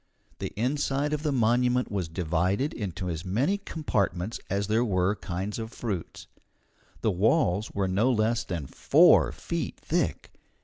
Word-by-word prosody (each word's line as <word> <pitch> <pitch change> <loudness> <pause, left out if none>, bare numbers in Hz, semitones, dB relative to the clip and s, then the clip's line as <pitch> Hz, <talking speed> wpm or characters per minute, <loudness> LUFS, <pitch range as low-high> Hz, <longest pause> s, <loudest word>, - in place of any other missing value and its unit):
The - - -4
inside 140 +3 0
of 150 - -1
the 150 -1 0
monument 125 0 +2
was 95 -5 -2
divided 90 - 0
into 95 -4 -4
as 80 -2 -3
many 130 - 0
compartments 110 - -2
as 100 +1 0
there 110 +3 +2
were 95 -2 +1
kinds 95 +3 -4
of 110 0 -5
fruits. 100 -10 -5 0.8
The 110 - +2
walls 105 - +2
were 100 -1 0
no 105 +8 +2
less 115 0 +1
than 85 -6 -4
four - - +5
feet - - -4
thick. - - -1
105 Hz, 145 wpm, -27 LUFS, 90-125 Hz, 0.8 s, four